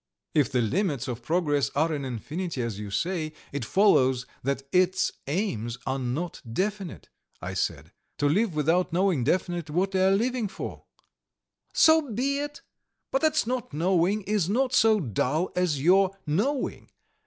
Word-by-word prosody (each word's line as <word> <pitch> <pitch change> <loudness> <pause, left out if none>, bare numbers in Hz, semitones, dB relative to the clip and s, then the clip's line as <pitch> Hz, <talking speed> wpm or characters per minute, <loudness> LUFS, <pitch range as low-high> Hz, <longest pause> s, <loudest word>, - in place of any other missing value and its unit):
"If 145 -2 +2
the 125 -2 +2
limits 140 - 0
of 125 -1 -4
progress 145 0 +1
are 160 +3 +2
in 140 -2 -3
infinity 140 - -4
as 110 -4 -4
you 105 -1 -6
say, 160 - -2 0.2
it 140 -2 -3
follows 130 - +3 0.2
that 135 +1 -2
its 185 +1 +2 0.2
aims 125 - -2
are 135 0 -1
not 135 +7 -3
definite," 190 - -3 0.3
I 90 +3 -5
said. 85 -3 -2 0.3
"To 145 - +2
live 190 +4 +1
without 165 +5 +2
knowing 180 -6 +2
definitely 170 +1 -1
what 190 +2 +1
you 190 - +2
are 190 - +5
living 230 +3 +1
for!" 195 - -7 0.9
"So 315 -4 +5
be 275 +6 0
it! 290 0 -6 0.5
But 270 - +1
that 310 -5 +2
'not 245 - -3
knowing' 180 +5 +1
is 200 -4 0
not 255 +4 +1
so 220 -3 +5
dull 150 - -1
as 180 -6 +1
your 190 +5 +4
'knowing.' 215 - -1
175 Hz, 155 wpm, -27 LUFS, 135-200 Hz, 0.9 s, are